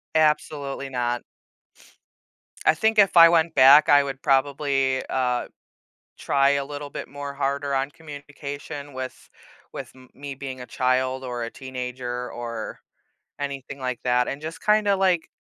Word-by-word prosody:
Absolutely 150 -3 0
not. 120 -1 -2 1.4
I - - +5
think 220 +4 +2
if 195 -3 +5
I 165 0 +10
went 165 -1 +2
back, 140 +3 +8
I 145 -1 +7
would 135 -1 -6
probably, 135 -1 +1
uh, 125 -2 0 0.7
try 140 0 +2
a 140 -1 0
little 145 0 -7
bit - - -7
more 140 0 -7
harder 140 0 -2
on 135 +1 0
communication 145 -1 -8
with 130 0 -7 0.4
with - - -7 0.2
me 140 0 -8
being 130 -1 -7
a 125 - -7
child 130 +1 0
or 120 -2 -4
a 115 - -4
teenager 125 -1 -5
or 115 -2 -6 0.6
anything 140 -1 -5
like 125 -2 -3
that, 125 0 +2
and 140 - -4
just 160 +1 -7
kinda, 210 -2 +3
like, 185 -4 +1
140 Hz, 145 wpm, -24 LUFS, 130-145 Hz, 1.4 s, I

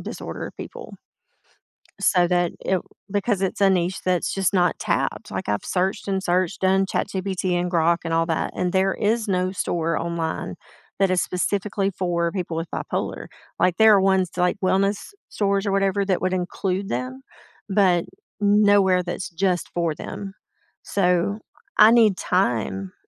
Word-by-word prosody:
disorder - - -6
people, - - -9 1.1
so 180 -2 +3
that 175 -1 +1
it 190 -1 0 0.3
because 205 -1 0
it's 190 - -1
a 195 - +6
niche 180 0 0
that's 180 -1 0
just 195 0 0
not 180 -2 +2
tapped, - - -2
like, - - -4
I've 105 - -1
searched 190 +2 -1
and 195 -1 -1
searched, 180 0 0
done 190 +1 +3
ChatGPT 190 -1 -2
and 180 0 -1
Grok 170 0 +3
and 165 - -2
all 165 0 +2
that, 160 - -1
and 180 -1 -1
there 190 0 +2
is 220 +1 0
no 185 -1 0
store, 165 -3 -1
online, 165 -1 -3 0.4
that 195 -1 +3
is 180 - +2
specifically 195 +2 -1
for 170 -2 -1
people 175 -4 -4
with 165 0 -3
bipolar, - - -3 0.3
like, 180 -1 +2
there 220 -1 +7
are 195 - +4
ones, 190 -2 +2
like, 180 +2 +1
wellness 195 - 0 0.2
stores 200 0 0
or 200 - 0
whatever 195 0 +1
that 190 -3 0
would 185 0 0
include 185 +2 -2
them, 125 +2 -4 0.5
but 185 -3 +3 0.4
n 205 +1 +4
nowhere 190 -3 +4
that's 175 +1 -5
just 180 +1 -1
for 170 -2 0
them, 195 +3 -7 0.5
so 180 +2 +1 0.4
I 215 +2 +8
need 220 -6 +5
time 110 - -1
185 Hz, 160 wpm, -23 LUFS, 175-195 Hz, 1.1 s, I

